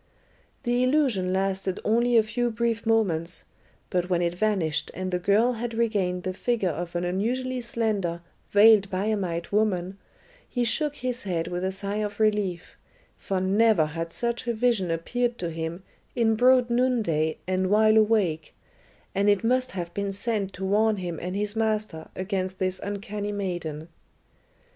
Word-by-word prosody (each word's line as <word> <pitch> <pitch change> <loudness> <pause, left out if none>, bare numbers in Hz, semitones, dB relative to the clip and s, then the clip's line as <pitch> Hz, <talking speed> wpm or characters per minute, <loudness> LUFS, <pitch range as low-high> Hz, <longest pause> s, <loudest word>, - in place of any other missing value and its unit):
The 245 +1 +1
illusion 255 -9 +2
lasted 190 0 -1
only 235 +2 +3
a 225 - +6
few 240 +3 -1
brief 230 0 -1
moments, 180 -7 +1 0.5
but 180 0 0
when 175 -1 +1
it 170 0 0
vanished 180 -5 0
and 185 0 -3
the 180 - 0
girl 205 +7 +3
had 235 0 -4
regained 200 -6 0
the 185 - -2
figure 210 -2 0
of 175 +1 -5
an 175 - 0
unusually 245 +8 -1
slender, 210 -8 -1 0.3
veiled 205 -1 +6
Biamite 185 -4 -2
woman, 195 -3 0 0.5
he 245 - -1
shook 290 +5 +1
his 250 -2 -3
head 170 -3 -2
with 180 +1 -3
a 190 - 0
sigh 200 +1 -3
of 210 -1 -3
relief, 210 -5 0 0.4
for 190 -1 -2
never 195 -2 +3
had 165 +2 -5
such 235 +5 -3
a 235 - 0
vision 220 -6 +1
appeared 240 +9 -1
to 170 -2 -3
him 165 +3 -5 0.3
in 230 -3 +3
broad 250 +1 +4
noonday 220 -11 +1
and 185 0 0
while 215 +1 +5
awake, 210 -8 +2 0.6
and 200 +1 +2
it 205 0 +3
must 255 +2 +1
have 175 -2 -5
been 200 -1 -2
sent 200 -1 -2
to 190 - -5
warn 215 +2 +2
him 175 -3 -4
and 180 +2 -4
his 205 +1 -1
master 215 -7 -1
against 190 -1 -3
this 185 0 -1
uncanny 205 0 -4
maiden. 175 -6 -4
200 Hz, 160 wpm, -26 LUFS, 180-225 Hz, 0.6 s, a